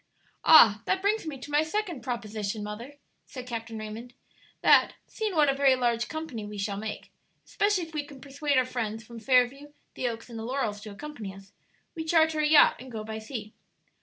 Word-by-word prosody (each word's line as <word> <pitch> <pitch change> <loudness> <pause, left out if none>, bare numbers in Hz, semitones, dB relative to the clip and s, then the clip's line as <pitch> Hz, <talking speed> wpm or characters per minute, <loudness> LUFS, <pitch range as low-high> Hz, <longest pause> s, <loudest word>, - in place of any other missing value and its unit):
"Ah, 220 -9 +8
that 380 - +1
brings 415 -3 +1
me 295 -3 -5
to 290 - -9
my 295 +1 +4
second 345 - -3
proposition, 215 -4 -4
mother," 230 +7 -7 0.3
said 255 -3 -8
Captain 230 -2 -5
Raymond; 220 +3 -8 0.5
"that - - +5
seeing 430 -4 -4
what 300 -2 +5
a 275 - +3
very 270 -1 +4
large 240 -2 0
company 315 -8 -5
we 210 0 -7
shall 200 0 -2
make, 215 +1 -6 0.3
especially 410 -3 +1
if 325 -1 -10
we 300 -1 -2
can 285 -2 -13
persuade 280 +1 -1
our 255 - +4
friends 225 -3 -4
from 235 0 -10
Fairview, 260 +5 +2 0.2
the 255 - -2
Oaks, 230 -1 -5
and 230 -2 -8
the - - -5
Laurels 230 -4 -2
to 215 - -8
accompany 220 -5 -8
us 195 0 -15 0.4
we 325 - -5
charter 320 -1 +3
a 305 - +3
yacht 300 0 +6
and 255 0 -10
go 220 -2 -5
by 220 0 -6
sea." 220 -1 -7
250 Hz, 200 wpm, -28 LUFS, 220-300 Hz, 0.5 s, Ah